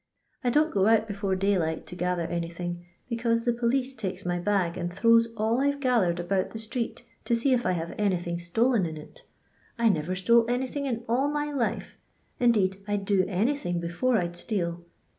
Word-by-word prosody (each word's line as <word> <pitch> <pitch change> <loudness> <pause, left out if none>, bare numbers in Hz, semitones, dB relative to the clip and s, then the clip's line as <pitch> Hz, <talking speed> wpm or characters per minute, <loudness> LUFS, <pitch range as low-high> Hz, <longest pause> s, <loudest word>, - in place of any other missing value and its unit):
I 245 - +2
don't 305 +5 +2
go 195 0 +3
out 225 0 +4
before 200 -2 -1
daylight 185 -5 0
to 180 - -9
gather 180 -1 -1
anything, 175 +1 -4 0.3
becnuse 230 0 0
the 240 - +3
police 250 +3 0
takes 195 -5 -5
my 175 0 0
bag 180 -2 0
and 175 -1 -3
thro\^ 230 +5 +5
s 230 - 0
all 225 +4 +1
I 280 - +3
"ve - - -9
ga 255 -3 +2
thered 175 -2 +1
about 185 +2 0
the - - -7
street 230 +2 -4 0.2
to 235 - +2
see 255 +3 +2
if 245 -4 +1
I 185 - +2
have 170 -1 -3
anything 175 -4 0
stolen 210 +4 +1
in 160 -1 -6
it - - -12 0.6
I 235 -1 +4
never 180 -1 0
stole 230 +5 +3
anything 260 +3 -1
in 235 -2 -2
all 250 +5 +2
my 295 0 -2
life, 265 -5 -2 0.4
indeed 210 -6 +3
I 205 0 0
'd 195 - -5
do 195 -2 +3
anything 200 -2 0
before 175 +9 0
I 180 - +1
*d 175 0 -6
steal. 175 -5 -2
205 Hz, 205 wpm, -27 LUFS, 175-240 Hz, 0.6 s, thro\^